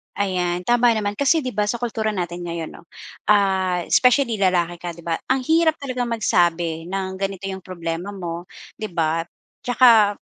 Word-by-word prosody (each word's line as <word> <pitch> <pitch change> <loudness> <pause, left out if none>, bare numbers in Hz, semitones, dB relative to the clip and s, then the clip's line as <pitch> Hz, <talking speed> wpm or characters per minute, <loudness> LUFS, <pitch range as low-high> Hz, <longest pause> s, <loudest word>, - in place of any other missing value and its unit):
Ayan 180 -3 -1
tama 240 +3 +3
naman. 205 -1 -2
Kasi 300 +3 +3
di 255 - -3
ba, 210 -3 -1
sa 235 +3 -3
kultura 220 -2 -1
natin 175 -2 -4
ngayon 170 -2 -4
'no, 170 - -14 0.5
ah, 190 -3 +2
especially 250 -3 +4
lalaki 175 -3 +1
ka 175 0 -6
'di 170 - -13
ba? 165 -1 -2
Ang 260 0 +1
hirap 320 +3 +3
talagang 255 -3 -2
magsabi 175 -7 0
ng 190 0 -4
ganito 195 0 -3
yung 190 -1 -7
problema 170 +2 -5
mo, 175 -2 -6 0.3
'di 215 -5 -6
ba? 165 0 0 0.4
Tsaka 235 -4 +5
195 Hz, 170 wpm, -22 LUFS, 175-230 Hz, 0.5 s, Tsaka